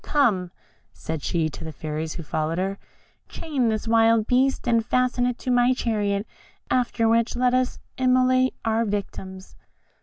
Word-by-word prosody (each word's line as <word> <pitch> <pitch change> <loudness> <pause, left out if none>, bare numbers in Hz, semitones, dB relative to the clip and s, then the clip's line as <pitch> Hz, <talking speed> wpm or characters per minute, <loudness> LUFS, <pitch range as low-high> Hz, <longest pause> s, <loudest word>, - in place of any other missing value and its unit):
Come," 215 -12 +1 0.4
said 160 -2 -5
she 165 +1 0
to - - -9
the 160 - -6
fairies 155 +1 -4
who 170 - -7
followed 155 +2 -2
her, 195 +2 -2 0.5
"chain 275 -7 -1
this 220 +1 -2
wild 225 -1 +4
beast, 260 +2 +1
and 230 -1 +3
fasten 250 +1 +1
it 250 -1 -2
to 255 - -3
my 245 +1 +4
chariot, 205 -4 -1 0.5
after 240 -2 +1
which 230 +1 +2
let 250 0 +2
us 255 0 +1 0.2
immolate 255 0 +3
our 225 +1 +1
victims." 195 -2 -5
230 Hz, 155 wpm, -24 LUFS, 190-250 Hz, 0.5 s, wild